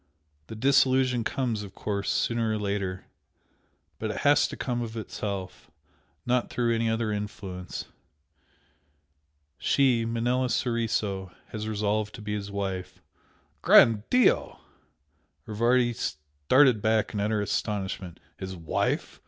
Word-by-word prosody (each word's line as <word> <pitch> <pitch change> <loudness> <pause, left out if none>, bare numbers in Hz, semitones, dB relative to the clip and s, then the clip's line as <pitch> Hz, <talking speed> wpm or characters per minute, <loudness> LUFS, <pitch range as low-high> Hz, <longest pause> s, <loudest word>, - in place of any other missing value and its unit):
The 110 - -8
disillusion 130 0 +3
comes, 120 -3 -1
of 100 -2 -10
course, 100 -1 -3
sooner 115 -1 0
or - - 0
later, 100 -3 -3 0.9
but - - -2
it - - -4
has 145 0 +4
to - - -8
come 120 -3 -2
of 115 -1 -5
itself 100 -3 -5 0.6
not 125 0 +1
through 120 -1 0
any 115 0 +1
other 110 -1 0
influence. 100 -3 -5 1.7
She 130 -4 +3
Manella 120 +2 0
Soriso 110 -7 -1 0.2
has 110 -1 -5
resolved 105 0 -1
to 115 - -10
be 105 0 -3
his 100 -1 -4
wife." 95 -2 -4 0.6
"Gran' 110 -3 +6
Dio!" 250 -1 +3 0.9
Rivardi 120 +3 +2
started 75 - +2
back 110 0 +1
in 105 - -2
utter 105 0 0 0.2
amazement 95 -4 -4 0.2
"His 95 -1 -5
wife? 80 -3 -2
110 Hz, 120 wpm, -27 LUFS, 100-120 Hz, 1.7 s, Gran